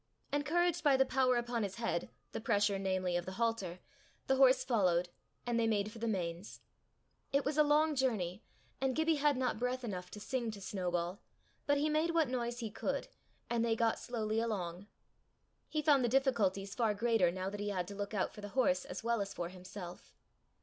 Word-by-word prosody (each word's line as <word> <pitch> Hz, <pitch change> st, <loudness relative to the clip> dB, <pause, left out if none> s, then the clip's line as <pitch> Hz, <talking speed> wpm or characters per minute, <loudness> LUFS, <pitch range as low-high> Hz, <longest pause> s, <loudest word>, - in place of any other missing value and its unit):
Encouraged 345 Hz, +4 st, +1 dB
by 285 Hz, -3 st, +5 dB
the 265 Hz, -, +5 dB
power 260 Hz, -1 st, +2 dB
upon 240 Hz, -1 st, -1 dB
his 200 Hz, -2 st, -2 dB
head, 230 Hz, -7 st, -2 dB, 0.2 s
the -, -, -4 dB
pressure, 205 Hz, -2 st, +2 dB
namely, 185 Hz, -2 st, 0 dB
of 175 Hz, 0 st, -1 dB
the 185 Hz, -, -4 dB
halter, 200 Hz, -5 st, -1 dB, 0.4 s
the 265 Hz, -, +2 dB
horse 260 Hz, -1 st, +6 dB
followed, 180 Hz, -8 st, +2 dB, 0.4 s
and 240 Hz, -1 st, +1 dB
they 225 Hz, -, +2 dB
made 210 Hz, -1 st, +1 dB
for 225 Hz, -, -10 dB
the 230 Hz, -, -2 dB
Mains. 180 Hz, -2 st, -3 dB, 0.7 s
It 280 Hz, 0 st, +2 dB
was 285 Hz, +1 st, 0 dB
a 305 Hz, -, +5 dB
long 300 Hz, +1 st, +3 dB
journey, 215 Hz, -9 st, 0 dB, 0.4 s
and 265 Hz, -1 st, +1 dB
Gibbie 315 Hz, 0 st, +2 dB
had 290 Hz, -1 st, +3 dB
not 255 Hz, -4 st, 0 dB
breath 250 Hz, +1 st, -1 dB
enough 180 Hz, -5 st, -4 dB
to 210 Hz, -, -9 dB
sing 240 Hz, +1 st, -2 dB
to 215 Hz, -2 st, -6 dB
Snowball, 180 Hz, -2 st, -2 dB, 0.5 s
but 285 Hz, 0 st, +4 dB
he 295 Hz, +2 st, +2 dB
made 315 Hz, +2 st, +1 dB
what 320 Hz, -5 st, +3 dB
noise 240 Hz, -1 st, -2 dB
he 225 Hz, -2 st, -4 dB
could, -, -, -2 dB, 0.4 s
and 235 Hz, -1 st, +1 dB
they 230 Hz, -1 st, +2 dB
got 225 Hz, 0 st, +1 dB
slowly 220 Hz, -2 st, -1 dB
along. 195 Hz, -5 st, -3 dB, 0.8 s
He 305 Hz, -1 st, -1 dB
found 285 Hz, -4 st, +5 dB
the 240 Hz, -, +2 dB
difficulties 215 Hz, -7 st, +1 dB
far 225 Hz, -4 st, +1 dB
greater 225 Hz, -4 st, +3 dB
now 185 Hz, +2 st, -3 dB
that 205 Hz, -, -6 dB
he 205 Hz, 0 st, -2 dB
had 180 Hz, -3 st, -2 dB
to -, -, -6 dB
look 205 Hz, +1 st, -4 dB
out 190 Hz, -, 0 dB
for 210 Hz, -, -10 dB
the 205 Hz, -, -6 dB
horse 185 Hz, -8 st, +3 dB
as 180 Hz, -, -6 dB
well 235 Hz, -2 st, +1 dB
as 200 Hz, 0 st, -4 dB
for 175 Hz, -1 st, -3 dB
himself. 185 Hz, -1 st, -10 dB
225 Hz, 205 wpm, -34 LUFS, 190-260 Hz, 0.8 s, horse